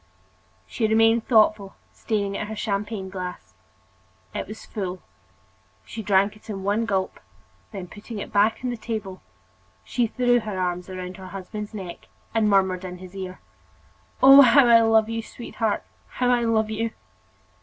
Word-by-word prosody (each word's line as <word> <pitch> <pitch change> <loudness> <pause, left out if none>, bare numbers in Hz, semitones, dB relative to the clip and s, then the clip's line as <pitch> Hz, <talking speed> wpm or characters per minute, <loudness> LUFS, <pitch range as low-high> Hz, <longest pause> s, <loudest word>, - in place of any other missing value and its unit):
She 225 - -1
remained 225 +1 +3
thoughtful, 215 -4 +3 0.2
staring 200 -3 -2
at 210 - -3
her 220 - -6
champagne 205 -1 -3
glass. 180 - -7 0.8
It - - -4
was 215 +2 -9
full 185 -3 -5 0.8
—she 220 - -7
drank 200 0 +2
it 215 - -18
in 195 -2 -5
one 210 +3 0
gulp; 190 -3 -1 0.5
then 195 -5 -6
putting 210 +5 -9
it 205 - -7
back 210 +2 +3
on 250 - -1
the 240 - -4
table, 215 -4 -5 0.6
she 235 - 0
threw 245 +1 +2
her 210 -4 -5
arms 180 0 -2
around 185 -1 -6
her 190 -1 -10
husband's 205 +3 -7
neck 185 -4 -8 0.3
and 220 -2 +2
murmured 190 -2 +2
in 180 -1 -6
his 185 +1 -12
ear: 185 -1 -7 0.8
"Oh! 270 +1 +10
how 275 +1 +7
I 230 -1 +7
love 225 -1 +4
you, 225 0 -3
sweetheart! 225 -1 -3 0.3
how 250 -1 +1
I 240 -1 +2
love 220 -1 +1
you!" 225 +1 -1
210 Hz, 160 wpm, -24 LUFS, 190-225 Hz, 0.8 s, Oh